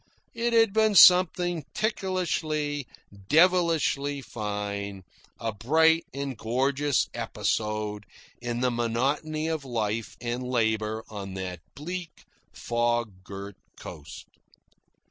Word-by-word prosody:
It 235 +1 -1
had 225 -3 +4
been 220 -1 +3
something 175 -2 +6
ticklishly, 155 - -1 0.4
devilishly 160 -4 +3
fine 100 -3 -4 0.4
a 115 - -2
bright 160 +9 +3
and 140 0 -4
gorgeous 135 +5 +1
episode 105 -1 -2 0.3
in 120 0 -3
the 125 -1 +2
monotony 135 +7 -1
of 160 -3 -2
life 115 -3 -3
and 120 +1 -3
labour 110 -3 0
on 100 -3 -7
that 90 -2 -5 0.2
bleak, 175 +3 -7 0.3
fog 120 -5 -1
girt 100 0 -8 0.2
coast. 75 -3 -9
125 Hz, 100 wpm, -27 LUFS, 110-160 Hz, 0.4 s, something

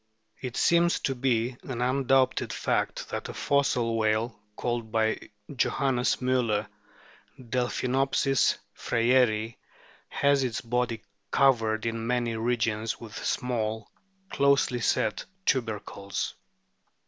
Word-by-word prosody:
It 125 -2 -5
seems 170 0 +3
to 135 - 0
be 120 -1 0
an 125 -3 -6
undoubted 130 +1 +2
fact - - -1
that - - -4
a - - -7
fossil 125 -5 +1
whale, 110 +1 0 0.2
called 120 -2 -3
by 110 0 0 0.3
Johannes 130 -1 +1
Mliller 125 -5 +1 0.7
Delphinopsis 130 +2 +1 0.2
freyeri, 115 -2 +2 0.5
has 140 -1 +2
its 120 -3 -1
body 120 -2 -1 0.3
covered 115 -5 +3
in 115 0 -2
many 120 -2 0
regions 110 -1 -1
with 110 -3 -8
small, 110 -3 -2 0.4
closely 140 -3 +3
set 110 -2 0 0.2
tubercles. 105 -5 -2
120 Hz, 100 wpm, -27 LUFS, 110-130 Hz, 0.7 s, seems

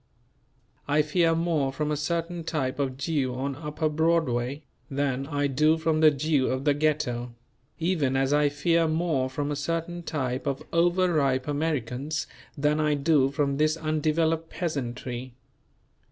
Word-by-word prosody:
I 150 +1 +3
fear 165 +2 +2
more 160 -5 0
from 150 +2 -2
a - - +1
certain 165 +3 -2
type 145 -5 -2
of 130 -2 -1
Jew 140 -3 -1
on 135 +1 -3
Upper 150 +2 -2
Broadway, 150 -4 0 0.3
than 135 -1 -1
I 145 -1 -1
do 150 +4 +3
from 160 -1 +1
the 155 -1 +7
Jew 145 -1 +1
of 130 +2 -2
the 145 - +4
Ghetto; 125 -5 -1 0.4
even 160 -6 0
as 135 +1 +2
I 145 0 +4
fear 165 +3 +2
more 155 -5 0
from 145 +2 -3
a - - -1
certain 165 +4 -3
type 130 -5 -3
of 135 -1 -2
over 175 +1 +3
ripe 135 -3 +1
Americans 145 0 -2 0.3
than 150 +2 +1
I 150 -1 +2
do 140 -2 +3
from 140 0 0
this 155 +2 +2
undeveloped 160 +1 0
peasantry. 130 -6 -4
150 Hz, 155 wpm, -27 LUFS, 135-160 Hz, 0.4 s, the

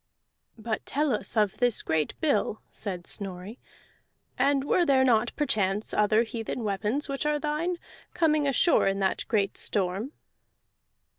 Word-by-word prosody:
"But 220 0 -3
tell 290 -1 +1
us 215 - -2
of 210 -3 +2
this 245 -3 +2
great 160 -2 -1
bill," 285 -8 0
said 185 -4 -5
Snorri. 195 +3 -4 0.8
"And 275 0 +2
were 350 +5 +2
there 270 -4 +4
not 240 -2 +3
perchance 210 -7 0
other 215 +2 +3
heathen 230 +1 -5
weapons 210 +7 -1
which 275 +1 -2
are 300 0 +1
thine, 310 +4 -2 0.4
coming 305 -4 +2
ashore 275 - +3
in 195 0 +1
that 195 -1 0
great 205 -3 0
storm?" 200 +7 -2
225 Hz, 140 wpm, -27 LUFS, 200-285 Hz, 0.8 s, there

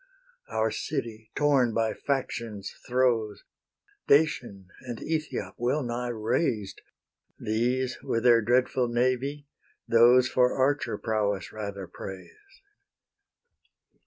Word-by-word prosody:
Our 110 0 0
city, 115 -7 -4
torn 135 -6 +3
by 115 -1 +1
faction's 115 -7 -3
throes, 120 -5 +1 0.6
Dacian 125 - +2
and 120 -3 -6
Ethiop 160 -1 -3
well 130 +5 0
nigh 120 0 -3
razed, 110 - -1 0.6
These 125 +4 -1
with 115 - -1
their 120 -2 +6
dreadful 125 +2 +2
navy, 130 +4 0 0.4
those 120 +2 +6
For 125 0 +2
archer 140 +2 +1
prowess 105 -3 -1
rather 100 -3 -5
praised. 390 - -11
120 Hz, 100 wpm, -27 LUFS, 110-130 Hz, 0.6 s, their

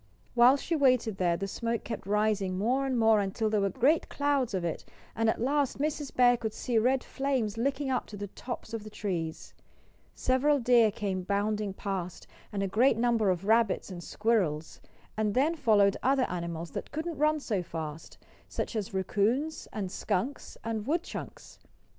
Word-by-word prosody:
While 250 +3 +6
she 330 +4 -2
waited 255 -8 +3
there 175 -2 +1
the 195 - -3
smoke 230 +3 -2
kept 225 - -6
rising 205 -2 +1
more 255 +7 +1
and 260 -2 0
more 220 -2 +5
until 205 +2 -1
there 210 -2 +2
were 195 - +2
great 280 - +2
clouds 280 -6 0
of 180 -2 -1
it; 165 - -3 0.3
and 225 0 +2
at - - 0
last 280 +3 +1
Mrs. 290 0 -2
Bear 245 -1 +5
could 220 -2 -4
see 235 -3 0
red 255 +3 +2
flames 265 -6 -1
licking 270 +3 -1
up 255 - -1
to 210 - -9
the 205 - -4
tops 240 0 -7
of 225 -2 -4
the 215 - -9
trees. 175 -7 -4 0.6
Several 275 +3 +2
deer 240 -3 +5
came 195 -2 -3
bounding 205 +2 -1
past, 190 -3 -5 0.3
and 200 -1 -2
a - - 0
great 225 +5 +3
number 230 -3 +2
of 185 +1 -1
rabbits 220 -2 +2
and 175 -1 -7
squirrels. 185 -10 -1 0.3
And 215 -1 0
then 290 +6 +3
followed 210 -9 +3
other 265 -1 +3
animals 170 -1 -4
that - - -6
couldn't 315 +1 -4
run 305 +1 +3
so 210 -9 -1
fast 160 -2 -7 0.3
such - - -4
as 200 -3 -3
raccoons, 220 - 0
and 195 -4 -4
skunks, 235 +11 -3
and 225 -1 -3
woodchucks. 340 +4 -4
220 Hz, 175 wpm, -29 LUFS, 195-260 Hz, 0.6 s, While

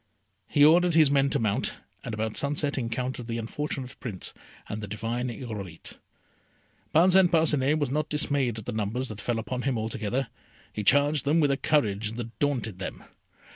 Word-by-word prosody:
He 145 - +5
ordered 170 +2 +5
his 155 -4 +6
men 140 -1 +3
to - - +1
mount, 110 -3 -1 0.3
and - - -5
about 110 0 -2
sunset 145 0 0
encountered 125 0 -3
the 115 -1 -3
unfortunate 130 +2 -4
Prince 105 -7 -4 0.3
and 105 0 -5
the 105 - -5
divine 115 +4 -3
Irolite. 105 -8 -7 0.9
Parcin 180 +3 +5
Parcinet 155 -3 +3
was 145 -4 -1
not 150 +1 -1
dismayed 140 -6 0
at 110 - -7
the - - -3
numbers 110 +5 -2
that 110 -1 -7
fell 120 -2 -1
upon 125 +3 -3
him 130 -2 0
altogether. 110 +3 -2 0.4
He 105 - -3
charged 145 +6 +4
them 150 +4 +2
with 145 -3 +3
a - - +2
courage 110 -8 +1
that 115 -2 -7
daunted 120 -9 -1
them. 95 - -6
125 Hz, 175 wpm, -27 LUFS, 110-145 Hz, 0.9 s, his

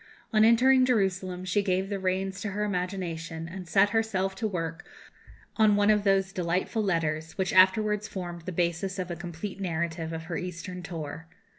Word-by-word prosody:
On 215 0 +5
entering 255 +3 +6
Jerusalem 190 -6 0
she 185 +3 +1
gave 190 -1 0
the 200 -1 -2
reins 190 +1 -1
to 200 -2 -3
her 210 +1 -1
imagination, 180 -4 -3
and 180 +1 -8
set 200 +4 +4
herself 205 -4 0
to 220 - -1
work 165 -4 -4 0.7
on 215 -2 +5
one 205 +1 +4
of 210 -1 +2
those 195 -1 +2
delightful 185 +4 -1
letters 160 -5 -1
which 190 -2 0
afterwards 210 +3 +4
formed 175 -2 -7
the - - -2
basis 175 +2 -1
of 185 -1 -3
a - - -3
complete 175 +4 -6
narrative 165 -2 -2
of 160 0 -5
her 165 0 -4
Eastern 180 0 -6
tour. 165 -2 -6
185 Hz, 175 wpm, -28 LUFS, 170-205 Hz, 0.7 s, entering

